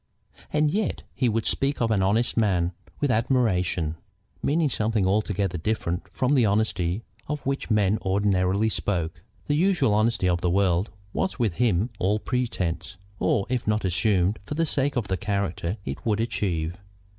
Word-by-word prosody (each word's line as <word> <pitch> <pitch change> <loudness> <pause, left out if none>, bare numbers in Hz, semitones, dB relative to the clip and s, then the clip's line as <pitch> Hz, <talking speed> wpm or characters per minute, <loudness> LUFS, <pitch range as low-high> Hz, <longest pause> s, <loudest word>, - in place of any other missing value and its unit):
And 150 0 +2
yet 210 +2 -1
he 125 - +1
would 115 0 0
speak 140 +1 0
of 115 -1 +1
an 100 -3 +2
honest 110 +5 +2
man 95 -6 +2 0.3
with 145 -3 +1
admiration, 95 - +1 0.4
meaning 155 +2 +2
something 110 -5 0
altogether 100 -2 0
different 90 -2 -2
from 130 +2 +1
the 130 -4 +4
honesty 100 -2 +1 0.2
of 150 -2 -4
which 135 -2 -2
men 105 -1 +3
ordinarily 95 +1 +2
spoke. 90 -5 -2 0.2
The 145 - 0
usual 160 - +3
honesty 110 -2 +2
of 85 -1 +1
the 90 - +1
world 95 +1 +2 0.2
was 190 - -1
with 110 -9 0
him 115 -2 +2
all 100 +3 +2
pretence, 105 -7 -2 0.2
or, 100 - +2
if 125 -3 -2
not, 105 -1 +1
assumed 95 +1 +2
for 145 - -5
the 165 +2 +2
sake 140 -2 0
of 120 -5 -1
the 95 - -1
character 100 -1 -2
it 70 - -5
would 110 -2 +1
achieve. 90 -7 -1
105 Hz, 165 wpm, -25 LUFS, 95-120 Hz, 0.4 s, the